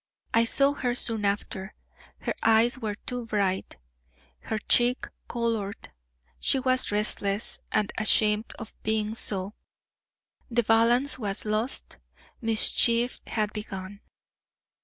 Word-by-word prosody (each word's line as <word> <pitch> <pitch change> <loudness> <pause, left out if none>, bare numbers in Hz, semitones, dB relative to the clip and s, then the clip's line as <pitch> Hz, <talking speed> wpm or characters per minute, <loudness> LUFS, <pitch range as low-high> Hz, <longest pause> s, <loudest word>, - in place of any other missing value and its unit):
I 230 0 +4
saw 275 +4 +2
her 250 -4 -2
soon 225 -4 0
after; 200 -1 -2 0.5
her - - -2
eyes 225 +3 +3
were 215 -4 -3
too 245 +2 -6
bright, 195 -3 -1 0.7
her 220 - -2
cheek 245 +3 +2 0.2
colored; 225 - -3 0.5
she 65 - +2
was 255 -2 0
restless, 205 0 -1
and 210 -1 +1
ashamed 215 0 +3
of 225 - -9
being 215 0 -1
so; 200 -3 -1 1.0
the 240 0 +2
balance 235 +5 +3
was 205 -2 0
lost; 215 +4 -3 0.4
mischief 230 +1 +3
had 210 -2 -1
begun. 200 -2 -7
220 Hz, 115 wpm, -27 LUFS, 210-240 Hz, 1.0 s, I